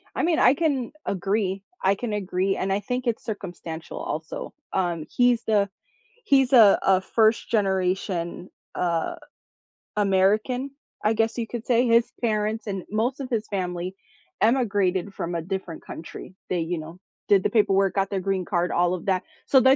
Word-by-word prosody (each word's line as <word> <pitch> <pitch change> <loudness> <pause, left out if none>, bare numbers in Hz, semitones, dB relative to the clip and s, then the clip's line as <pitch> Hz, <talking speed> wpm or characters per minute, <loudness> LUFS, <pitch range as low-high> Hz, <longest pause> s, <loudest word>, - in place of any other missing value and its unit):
I - - 0
mean, 335 -1 +2
I 250 - +6
can 280 -6 0
agree, 195 0 -1 0.2
I 195 +1 +4
can 220 +1 -4
agree, 190 -1 0
and 195 - -1
I 195 - +1
think 250 +4 -3
it's 235 - -1
circumstantial, 175 -6 -6
also, 160 +1 -5 0.2
um, 175 -4 -1
he's 245 -1 +3
the 205 -2 +2 0.6
he's 270 - +3
a 220 -6 +8
a 190 -1 +4
1st 220 +3 +2
generation, 185 -3 -1 0.2
uh, 170 -2 0 0.8
American, 210 +7 +2 0.3
I 215 +1 +3
guess 225 +2 0
you 230 - -1
could 235 +1 -6
say, 245 0 +3
his 230 0 +4
parents 215 -1 0
and 195 -3 -4
most 235 +6 0
of 265 - -5
his 220 -3 -1
family 180 -2 -3 0.5
emigrated 205 -5 +2
from 170 +1 -3
a 170 - -2
different 185 -1 -5
country. 165 +3 -9 0.2
They, 180 - +1
you 165 +1 -2
know, 160 +3 -9 0.3
did 200 -2 +5
the - - +1
paperwork, 195 -4 +3
got 195 0 0
their 195 - -1
green 190 0 -1
card, 175 -1 0
all 175 +1 +2
of 180 - -6
that, 185 -2 +1 0.2
so, 265 - +6
th 260 - +5
200 Hz, 170 wpm, -25 LUFS, 185-230 Hz, 0.8 s, a